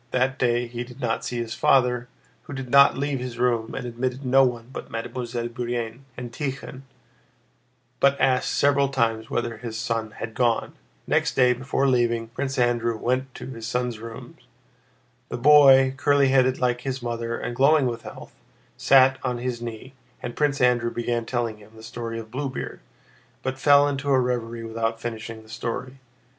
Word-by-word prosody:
That 130 +2 0
day 120 -1 +2
he 120 0 -5
did 125 +1 -13
not 115 -3 -1
see 120 - -3
his 115 -1 -3
father, 125 -2 +2 0.4
who - - -8
did 135 -2 -6
not 140 -1 +6
leave 140 -1 -1
his 125 -1 -6
room 120 -2 0
and 125 - -4
admitted 125 +3 -3
no 135 +2 +5
one 120 -3 -1
but - - -7
Mademoiselle 120 +1 -4
Bourienne 120 +1 -4
and 120 -2 -7
Tíkhon, 135 -1 -5 1.2
but 140 0 +3
asked 130 -1 +2
several 140 -1 +2
times 115 -4 0
whether 120 -1 -2
his 110 -1 -6
son 115 0 -2
had 115 - -5
gone. 120 -1 0 0.3
Next - - +1
day, 125 -1 +5
before 130 +2 -1
leaving, 120 -3 +1
Prince 135 +3 -4
Andrew 120 -2 +1
went 130 +3 -1
to - - -8
his 115 -4 -7
son's 120 -1 -2
rooms. 115 0 -10 0.9
The - - -4
boy, 135 -1 +7
curly 140 -1 +3
headed 130 -1 +3
like 125 -1 0
his 130 -1 -4
mother 115 0 -3
and 120 - -5
glowing 140 +2 +4
with 115 -2 -2
health, - - -11 0.4
sat 135 -1 +5
on 125 -2 -2
his 120 -1 -4
knee, 120 +3 -7 0.3
and 120 - -5
Prince 145 -2 +1
Andrew 120 -1 +3
began 120 0 -2
telling 120 -3 -2
him 105 +1 -17
the 110 - -13
story 115 0 -5
of 110 -1 -8
Bluebeard, 130 0 -4 0.6
but 130 0 -3
fell 145 0 +6
into 140 0 -2
a 135 -1 +4
reverie 120 -2 -2
without 115 0 -2
finishing 115 -1 -6
the - - -19
story. 125 +4 -5
125 Hz, 175 wpm, -24 LUFS, 115-130 Hz, 1.2 s, boy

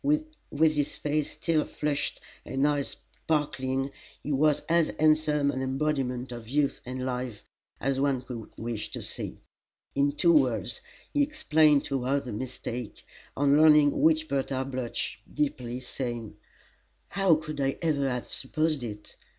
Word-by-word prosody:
With 295 - +1
his 145 -2 -1
face 150 0 0
still 160 -2 +1
flushed 145 -1 -2 0.2
and 135 +2 +1
eyes 145 -2 -1 0.3
sparkling 135 -3 0 0.3
he 150 - -3
was 150 +1 +3
as 165 -1 +2
handsome 155 -2 +3
an 130 - -3
embodiment 130 -2 -1
of 120 -2 -8
youth 145 +1 +1
and 130 0 -3
life 125 -4 -4 0.3
as 135 0 0
one 135 -2 +1
could 115 -4 -7
wish 115 -2 -4
to - - -4
see. - - -5 0.6
In 140 +1 +2
two 170 +3 +4
words 125 -5 +2 0.3
he 290 - +3
explained 160 - +4
to 135 -2 -1
her 140 +2 +2
the 130 -5 -7
mistake, 120 -1 -5 0.3
on 140 +1 +4
learning 150 -2 +6
which 155 0 +4
Bertha 135 -2 -1
blushed 130 -3 -3
deeply, 125 -4 -2
saying: 120 -3 -4 0.7
"How 195 -4 +4
could 155 -2 -4
I 135 0 0
ever 140 -4 +2
have 125 -1 -4
supposed 155 +2 0
it!" 105 -3 -7
140 Hz, 145 wpm, -28 LUFS, 130-155 Hz, 0.7 s, learning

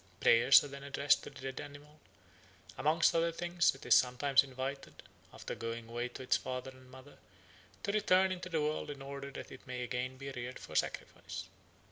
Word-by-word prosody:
Prayers 120 +4 +7
are - - -5
then 140 0 -9
addressed 140 +1 +2
to - - -8
the - - -13
dead 130 - -7
animal; 145 +1 -12 0.8
amongst 160 +3 +3
other 170 0 +2
things 175 -2 +1
it 135 - -13
is - - +5
sometimes 130 +2 +4
invited, 135 +1 -6 0.3
after - - -7
going 115 0 -5
away 120 +1 -3
to 125 +1 -9
its 125 - +3
father 130 +1 -5
and 130 -1 -17
mother, 130 +2 -14 0.6
to - - 0
return 190 -2 +3
into 180 0 -5
the 160 -3 0
world 150 0 -1
in 145 -1 -6
order 140 0 -6
that 140 - -9
it - - -12
may 125 -1 -4
again 125 +1 -3
be 135 +1 -6
reared 125 0 -6
for - - -11
sacrifice. - - -3
135 Hz, 190 wpm, -34 LUFS, 125-150 Hz, 0.8 s, Prayers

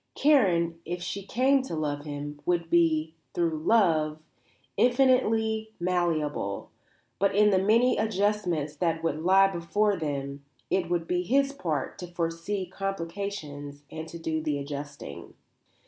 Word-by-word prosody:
Karen, 175 - +3
if 175 +1 -4
she 195 +3 -4
came 260 +7 +2
to 260 -10 -5
love 145 -1 -2
him, 145 0 -6
would 170 0 0
be, 160 -2 +3 0.2
through 170 -2 +1
love, 160 -6 +3 0.6
infinitely 225 - +2
malleable, 165 - -1 0.5
but 200 0 +2
in 210 0 +5
the 190 - +4
many 230 +6 +3
adjustments 195 -8 0
that 165 +1 -1
would 155 -2 -1
lie 190 +3 +6
before 195 +3 +1
them 140 -4 -4 0.3
it 180 -3 +1
would 175 -1 0
be 180 0 +1
his 275 +8 +2
part 160 - -3
to 180 - -6
foresee 170 +3 -3
complications 170 -6 -5
and 160 0 -6
to 170 - -8
do 160 -1 -2
the 150 -2 -1
adjusting. 140 - -7
170 Hz, 135 wpm, -28 LUFS, 155-205 Hz, 0.6 s, lie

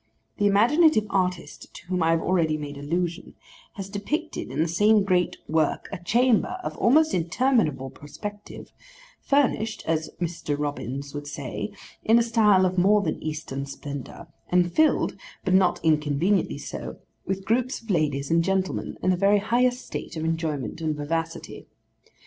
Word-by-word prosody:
The 205 - +3
imaginative 230 +5 +4
artist 180 -2 -2
to - - -11
whom 180 0 -1
I 165 - +3
have 165 0 +2
already 165 -4 +1
made 145 -1 -6
allusion, 170 +4 -3 0.4
has 195 -3 -6
depicted 285 - -4
in - - -6
the 160 - +2
same 205 +5 +4
great 180 -2 +1
work, 155 -1 0
a 185 -3 -7
chamber 245 - +2
of - - -4
almost 310 +6 +4
interminable 170 - +1
perspective, 205 +8 -9 0.5
furnished, 225 -6 +1
as 160 -1 -1
Mr. 165 -4 -3
Robins 140 -1 -4
would 145 0 -6
say, 145 +8 -5 0.3
in 225 +2 +5
a 235 - +4
style 210 -5 +4
of 185 0 0
more 205 +3 +4
than 155 - -2
Eastern 150 -3 -4
splendour, 140 +3 -8 0.2
and 175 -1 +2
filled 315 0 +2 0.3
(but 185 - +1
not 185 -1 +4
inconveniently 155 +5 +1
so) - - -7 0.3
with 195 0 -3
groups 250 +4 0
of 225 -2 -6
ladies 145 -5 0
and 165 0 +4
gentlemen, 190 0 -1
in 185 - +3
the - - +3
very 200 +3 +4
highest 245 +4 +1
state - - -6
of 160 - -3
enjoyment 160 -4 -2
and 155 -1 -1
vivacity. 165 +3 -4
180 Hz, 155 wpm, -25 LUFS, 155-210 Hz, 0.5 s, in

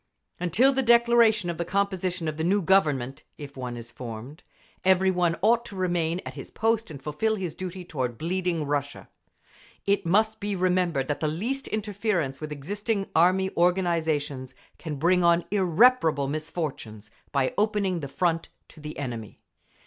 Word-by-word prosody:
Until 180 - +3
the 265 - +1
declaration 235 -4 +4
of 170 - -8
the - - +1
composition 185 -2 -1
of 155 -1 -3
the 160 - -2
new 195 +3 +2
Government—if 145 -5 0
one 125 -2 -5
is 120 0 -9
formed—every 150 +10 -2
one 175 -2 +1
ought 235 +2 +4
to 205 - -8
remain 175 -2 0
at - - -6
his - - -9
post 225 -1 0
and 150 -3 -8
fulfil 150 +11 -1
his 180 -6 -4
duty 185 +1 -6
toward 130 -8 -3
bleeding 175 0 -1
Russia. 145 0 -3 0.8
It 200 0 +2
must 215 +5 +2
be 205 0 -2
remembered 180 -6 +1
that 145 -1 -2
the 155 - 0
least 230 - -2
interference 200 -10 -2
with 155 0 -5
existing 200 - -3
Army 185 +3 +4
organisations 160 -7 0 0.2
can 155 -3 -5
bring 175 +5 +2
on 170 0 +4
irreparable 185 - +4
misfortunes, 140 - -5 0.2
by 135 -2 +1
opening 205 -4 +1
the 140 - -5
Front 165 +4 -1 0.2
to - - -15
the 150 0 -8
enemy. 120 -6 -6
175 Hz, 155 wpm, -26 LUFS, 150-200 Hz, 0.8 s, declaration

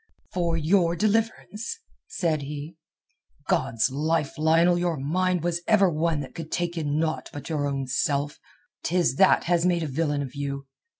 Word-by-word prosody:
"For 170 -2 0
your 170 +1 +2
deliverance?" 220 - -1 0.3
said 160 -5 -1
he. 150 +3 -6 0.7
"God's 115 +2 +1
life! 150 +1 0
Lionel, 165 +3 +4
your 175 -2 0
mind 180 +5 0
was 170 0 0
ever 200 -4 +5
one 160 -1 0
that 135 - -8
could 165 -2 -7
take 175 0 -1
in 150 -3 -1
naught 160 0 -1
but 145 - -8
your 150 -3 0
own 135 -1 -2
self. 140 +2 -1 0.4
'Tis 165 -6 +1
that 190 - +5
has 170 -1 +2
made 175 -2 +2
a - - -2
villain 145 0 -1
of 130 -2 -7
you. 140 -1 -4
165 Hz, 165 wpm, -26 LUFS, 145-175 Hz, 0.7 s, ever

